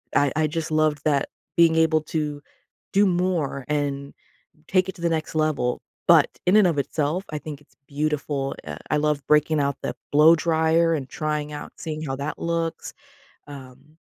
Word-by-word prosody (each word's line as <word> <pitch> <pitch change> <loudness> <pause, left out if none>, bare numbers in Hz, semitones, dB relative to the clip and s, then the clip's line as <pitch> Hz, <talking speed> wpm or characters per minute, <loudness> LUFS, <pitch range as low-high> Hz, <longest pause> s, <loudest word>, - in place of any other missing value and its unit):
I 145 -2 +3
I 155 0 +2
just 155 +1 -4
loved 155 -1 +2
that 145 -2 +1 0.3
being 165 -1 +5
able 160 -1 +3
to 150 -2 -3 0.5
do 200 +1 +5
more 175 -7 0
and 140 -1 -2 0.6
take 185 0 +2
it 190 - -4
to - - -13
the 170 - +2
next 160 -1 -2
level, 155 -6 0 0.3
but - - +7 0.2
in 190 +4 +5
and 210 - +6
of 165 - 0
itself, 155 +6 -1
I 155 - -3
think 150 -1 -8
it's 145 - -26
beautiful. 145 -2 -2
I 75 +1 -6
I 150 - +2
love 150 -1 0
breaking 150 0 +3
out 140 0 0
the - - -3 0.2
blow 155 +3 +7
dryer 165 0 +2
and 135 -4 -4
trying 150 -1 -3
out 145 - -7
seeing 155 -1 -5
how 135 -3 -3
that 140 +2 -4
looks. 165 -1 -3 0.6
Um. 140 +2 -13
155 Hz, 180 wpm, -24 LUFS, 145-160 Hz, 0.6 s, but